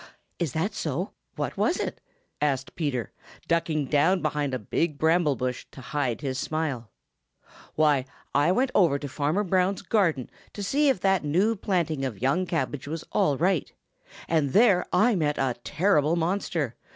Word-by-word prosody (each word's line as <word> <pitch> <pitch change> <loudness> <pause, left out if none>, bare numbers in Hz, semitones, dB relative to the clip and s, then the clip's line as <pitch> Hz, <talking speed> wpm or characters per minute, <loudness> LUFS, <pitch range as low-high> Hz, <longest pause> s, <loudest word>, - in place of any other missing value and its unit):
"Is - - -1
that - - -1
so? - - -3 0.2
What - - -3
was - - +2
it?" - - -4 0.4
asked 135 -3 0
Peter, 140 -8 -2 0.4
ducking 165 -3 +1
down 160 +6 +2
behind 150 -2 -1
a 130 - -1
big 145 - -1
bramble 160 -2 +3
bush 125 +1 -3
to - - -13
hide 125 0 -2
his 135 -2 -3
smile. 145 -9 -3 0.9
"Why, 150 -4 +3 0.3
I 145 +5 +3
went 255 +6 +1
over 170 -8 +4
to 145 - -6
Farmer 150 +8 0
Brown's 190 +1 +1
garden 170 - +1 0.2
to 205 - -5
see 285 +8 +2
if 265 - +1
that 195 -3 +2
new 185 +10 +2
planting 170 -8 -1
of 120 -7 -3
young 145 +9 +1
cabbage 150 -5 -2
was 160 +2 -4
all 145 -3 +2
right, 180 0 +1 0.6
and 155 -5 +1
there 205 -4 +5
I 235 +3 +4
met 150 -6 0
a 130 -3 0
terrible 155 - +2
monster. 170 - -1
155 Hz, 165 wpm, -26 LUFS, 140-185 Hz, 0.9 s, there